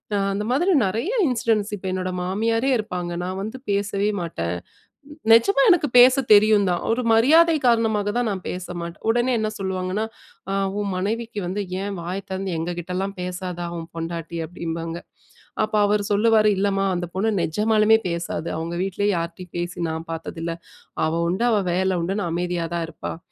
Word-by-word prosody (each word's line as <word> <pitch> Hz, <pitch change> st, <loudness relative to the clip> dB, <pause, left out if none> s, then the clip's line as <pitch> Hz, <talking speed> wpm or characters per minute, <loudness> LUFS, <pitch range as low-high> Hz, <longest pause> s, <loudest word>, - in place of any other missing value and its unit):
அ -, -, +2 dB
அந்த 200 Hz, +1 st, -2 dB
மாதிரி 340 Hz, +10 st, +2 dB
நிறைய 220 Hz, -, -1 dB, 0.2 s
இன்சிடென்ட்ஸ் 225 Hz, -5 st, +1 dB
இப்ப 195 Hz, -, -11 dB
என்னோட 185 Hz, 0 st, -2 dB
மாமியாரே 225 Hz, +7 st, 0 dB
இருப்பாங்க, 180 Hz, -5 st, -4 dB
நான் 185 Hz, +1 st, -3 dB
வந்து 215 Hz, +6 st, -5 dB
பேசவே 200 Hz, 0 st, 0 dB
மாட்டேன். 90 Hz, -, -3 dB, 0.8 s
நிஜமா 230 Hz, -, +6 dB
எனக்கு 350 Hz, -5 st, +4 dB
பேச 250 Hz, +1 st, +9 dB, 0.2 s
தெரியும் 210 Hz, -1 st, +6 dB
தான். 175 Hz, -, 0 dB
ஒரு 235 Hz, +2 st, +1 dB
மரியாதை 315 Hz, +9 st, +6 dB
காரணமாக 220 Hz, -3 st, +2 dB
தான் 245 Hz, -1 st, +1 dB
நான் 190 Hz, -2 st, -5 dB
பேச 180 Hz, 0 st, -4 dB, 0.2 s
மாட்டேன். 170 Hz, 0 st, -8 dB
உடனே 240 Hz, +3 st, +2 dB
என்ன 215 Hz, 0 st, 0 dB
சொல்லுவாங்கன்னா, 190 Hz, +2 st, -2 dB, 0.5 s
''அ -, -, 0 dB, 0.3 s
உன் 200 Hz, -, -2 dB
மனைவிக்கு 215 Hz, +4 st, -2 dB
வந்து 195 Hz, +3 st, -2 dB, 0.2 s
ஏன் 200 Hz, 0 st, -3 dB
வாய 175 Hz, +3 st, -4 dB
திறந்து 190 Hz, 0 st, -3 dB
எங்க 170 Hz, +2 st, -2 dB
கிட்டலாம் 185 Hz, +3 st, -3 dB
பேசாதா? 180 Hz, -1 st, -4 dB
உன் 165 Hz, -1 st, -6 dB
பொண்டாட்டி'' 165 Hz, 0 st, -5 dB
அப்பிடிம்பாங்க. 165 Hz, 0 st, -5 dB, 0.6 s
அப்போ 215 Hz, 0 st, 0 dB
அவரு 205 Hz, 0 st, +1 dB
சொல்லுவாரு 215 Hz, 0 st, +4 dB
''இல்லம்மா! 195 Hz, 0 st, +1 dB
அந்த 175 Hz, 0 st, -3 dB
பொண்ணு 215 Hz, +4 st, +1 dB
நெஜமாலுமே 215 Hz, +5 st, +3 dB
பேசாது, 170 Hz, -1 st, -3 dB
அவுங்க 165 Hz, +1 st, -4 dB
வீட்டிலயே 205 Hz, +2 st, 0 dB
யார்ட்டயும் 170 Hz, +1 st, -6 dB
பேசி 175 Hz, +1 st, -4 dB
நான் 160 Hz, +1 st, -5 dB
பார்த்ததில்ல. 165 Hz, +1 st, -4 dB, 0.5 s
அவ 165 Hz, +1 st, 0 dB
உண்டு, 190 Hz, +7 st, 0 dB
அவ 215 Hz, -, +3 dB
வேல 185 Hz, 0 st, +1 dB
உண்டுன்னு 195 Hz, +3 st, -1 dB
அமைதியா 175 Hz, 0 st, -1 dB
தான் 170 Hz, -1 st, -1 dB
இருப்பா'' 165 Hz, -, -6 dB
195 Hz, 160 wpm, -23 LUFS, 175-215 Hz, 0.8 s, பேச